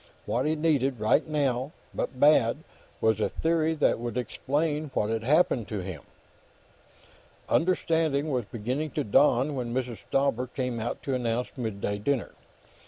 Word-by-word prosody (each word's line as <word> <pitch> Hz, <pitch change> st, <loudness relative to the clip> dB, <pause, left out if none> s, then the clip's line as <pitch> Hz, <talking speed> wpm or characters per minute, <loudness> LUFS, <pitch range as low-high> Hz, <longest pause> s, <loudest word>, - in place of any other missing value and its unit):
What 125 Hz, +5 st, 0 dB
he 155 Hz, -, +1 dB
needed, 140 Hz, -5 st, +1 dB
right 110 Hz, +9 st, +2 dB
now, 140 Hz, -2 st, 0 dB, 0.2 s
but 125 Hz, -, -3 dB
bad, 145 Hz, -1 st, +4 dB, 0.4 s
was 110 Hz, -1 st, +3 dB
a -, -, +1 dB
theory 160 Hz, -1 st, +1 dB
that 150 Hz, -, +2 dB
would 120 Hz, 0 st, -4 dB
explain 150 Hz, +5 st, -1 dB
what 105 Hz, +1 st, +1 dB
had 115 Hz, 0 st, -1 dB
happened 130 Hz, -, +2 dB
to 105 Hz, -3 st, -3 dB
him. 90 Hz, -5 st, -6 dB, 1.5 s
Understanding 160 Hz, -4 st, +1 dB
was 125 Hz, -4 st, -1 dB
beginning 125 Hz, +9 st, -3 dB
to -, -, +2 dB
dawn 130 Hz, +5 st, +3 dB
when 120 Hz, -3 st, -3 dB
Mrs. 125 Hz, -3 st, -2 dB
Stauber 135 Hz, -2 st, +1 dB
came 125 Hz, -2 st, -3 dB
out 110 Hz, -, -4 dB
to 135 Hz, -, -2 dB
announce 120 Hz, -1 st, -1 dB
midday 100 Hz, -4 st, -3 dB
dinner. 130 Hz, +1 st, -1 dB
130 Hz, 150 wpm, -27 LUFS, 115-150 Hz, 1.5 s, bad